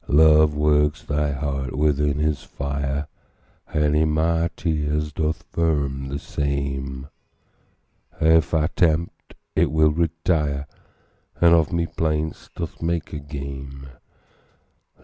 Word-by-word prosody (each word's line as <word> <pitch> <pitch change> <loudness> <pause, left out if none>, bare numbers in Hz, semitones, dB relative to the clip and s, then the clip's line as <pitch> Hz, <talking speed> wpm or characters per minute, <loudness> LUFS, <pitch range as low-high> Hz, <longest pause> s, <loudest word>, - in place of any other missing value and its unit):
Love 75 0 +5
works 75 0 +2
thy 75 0 0
heart 70 -2 -3
within 75 -1 +2
his 75 -1 0
fire, 70 +1 -3 0.6
And 75 -1 +2
in 80 0 +3
my 80 +2 +1
tears 75 -2 -1
doth 80 +1 -1
firm 70 -5 0
the 70 +1 -3
same; 70 -2 -3 1.1
And 80 - +3
if 80 - 0
I 80 -2 +2
tempt, 85 0 0 0.2
it - - +3
will 80 0 +4
retire, 80 -3 0 0.7
And 85 -1 +6
of 80 -2 +3
my 85 -1 0
plaints 80 -1 -2
doth 85 -2 -6
make 85 -1 -2
a 75 - -3
game. 70 -1 -7
75 Hz, 120 wpm, -23 LUFS, 70-80 Hz, 1.1 s, And